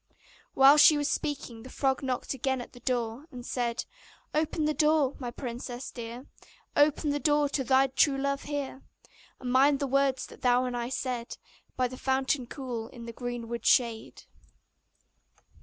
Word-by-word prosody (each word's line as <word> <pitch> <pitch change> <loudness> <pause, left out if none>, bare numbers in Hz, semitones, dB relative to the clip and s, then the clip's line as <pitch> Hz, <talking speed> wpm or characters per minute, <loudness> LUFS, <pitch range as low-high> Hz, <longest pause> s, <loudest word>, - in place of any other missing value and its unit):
While 270 +2 +8
she 300 0 +8
was 290 -1 0
speaking 260 -6 -3
the 255 - -11
frog 270 0 0
knocked 260 -1 -2
again 265 0 -1
at 245 - -9
the 245 - -13
door, 245 +3 -2
and 245 -2 -9
said: 240 -2 -2 0.5
'Open 310 0 0
the 305 - +1
door, 300 -3 +3
my 250 -3 -4
princess 245 0 -6
dear, 235 +2 -8 0.5
Open 295 +1 +3
the 290 - -1
door 295 0 +3
to 275 -1 -1
thy 265 +1 +4
true 270 +1 +2
love 275 0 -2
here! 285 -2 -4 0.6
And 250 -1 -4
mind 275 +3 +5
the 280 - -2
words 275 -1 +1
that - - -14
thou 250 0 +3
and 250 -1 -3
I 240 0 -3
said 250 -3 -4 0.4
By 255 -1 +2
the 255 +1 -9
fountain 265 0 0
cool, 245 -4 -5
in 235 -1 -11
the 230 - -7
greenwood 235 -1 -5
shade. 230 -3 +1
260 Hz, 170 wpm, -29 LUFS, 245-280 Hz, 0.6 s, While